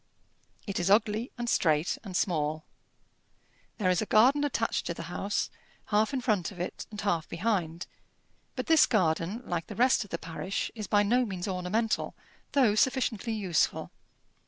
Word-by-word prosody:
It 200 - -3
is 175 +2 0
ugly, 215 +3 +2
and 240 0 -3
straight, 155 -6 +2
and 190 -4 -3
small. 155 -3 -1 1.1
There 190 -5 +2
is 180 - +1
a 215 - -3
garden 260 +7 +5
attached 245 -5 -1
to 170 - -3
the - - -6
house, 205 +1 -1 0.4
half 215 +1 +3
in 265 -2 -2
front 210 -8 0
of 185 - -12
it 180 - -5
and 210 - -8
half 175 -6 -1
behind; 170 -3 -1 0.7
but - - -3
this 320 -2 +5
garden, 185 +3 0
like 170 -2 -3
the - - -8
rest 250 0 +3
of 205 - -15
the 170 - -3
parish, 165 +4 -4
is 215 -3 -6
by 205 0 +3
no 245 +5 +3
means 190 -5 -4
ornamental, 195 +4 -1 0.4
though 255 -7 +4
sufficiently 235 -1 +1
useful. 190 -7 0
205 Hz, 165 wpm, -29 LUFS, 175-230 Hz, 1.1 s, garden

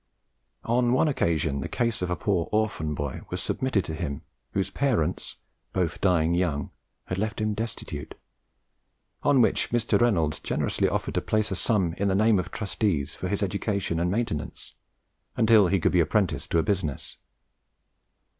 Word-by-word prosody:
On 120 +1 +2
one 130 - +3
occasion 80 - 0
the - - -4
case 115 -4 -1
of 90 - -1
a 90 - 0
poor 95 -6 0
orphan 105 -9 0
boy 70 -2 -4
was - - -3
submitted 130 -7 0
to 80 - -4
him, 75 -1 -4 0.3
whose 95 -1 -1
parents, 110 - 0 0.4
both 85 -4 -1
dying 85 -3 +3
young, 85 -5 0 0.3
had 95 - -3
left 110 +1 -2
him 110 0 0
destitute, 105 -9 -5 1.1
on 145 -3 +4
which - - +1
Mr. 120 0 +1
Reynolds 85 -11 +2
generously - - 0
offered - - -2
to - - 0
place 110 -1 0
a - - 0
sum 95 -4 +1
in 100 - +1
the 95 - +2
names 110 0 +4
of 90 - -3
trustees 100 -8 -1
for - - -4
his - - -1
education 100 -5 -1
and 85 +1 +1
maintenance 100 -7 -3 0.6
until 110 -3 +6
he 95 +2 +2
could - - +2
be 90 - +3
apprenticed 95 +3 +1
to - - +2
a 80 - +3
business. 85 -6 -2
95 Hz, 165 wpm, -26 LUFS, 80-110 Hz, 1.1 s, until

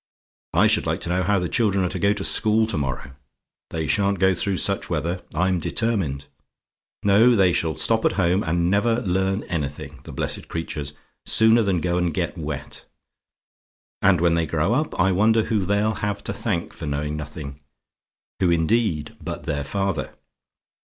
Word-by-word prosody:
"I - - +5
should - - +3
like - - -1
to - - -2
know 90 +1 +1
how 100 +3 +2
the 90 -1 -1
children 100 -3 +1
are - - -1
to 95 - -4
go 100 +4 +3
to 105 -1 -2
school 110 +2 +4
to 110 - -2
morrow? 65 -1 -4 0.6
They 80 -1 -3
sha'n't 100 +7 +1
go 95 +1 +3
through 95 +2 -1
such 100 +1 +1
weather, 85 +2 -2
I'm 90 +2 +1
determined. 85 -8 -1 0.8
No: 110 +5 +5
they 95 -4 +4
shall 80 -2 0
stop 110 +8 +1
at - - +3
home 90 0 +1
and 85 0 0
never 115 +4 +1
learn 95 +1 0
anything 75 -4 -5
the - - -10
blessed - - -2
creatures! 75 -4 -5 0.3
sooner 110 +1 +5
than 95 -5 0
go 90 +1 0
and 90 -1 0
get - - -2
wet. 75 -3 -6 1.2
And 95 -3 +4
when 85 -1 +3
they 85 -1 0
grow 80 +7 0
up, 150 -2 -1
I 95 +2 +4
wonder 110 +4 +3
who 105 -4 -1
they'll 105 +2 +1
have 100 0 -3
to - - -2
thank 90 -7 -3
for 80 - -7
knowing 75 +1 -2
nothing 75 -2 -7 0.8
who, 90 - +2
indeed, 85 -2 0
but - - -6
their 70 0 -2
father? 95 -4 -3
90 Hz, 180 wpm, -23 LUFS, 80-100 Hz, 1.2 s, I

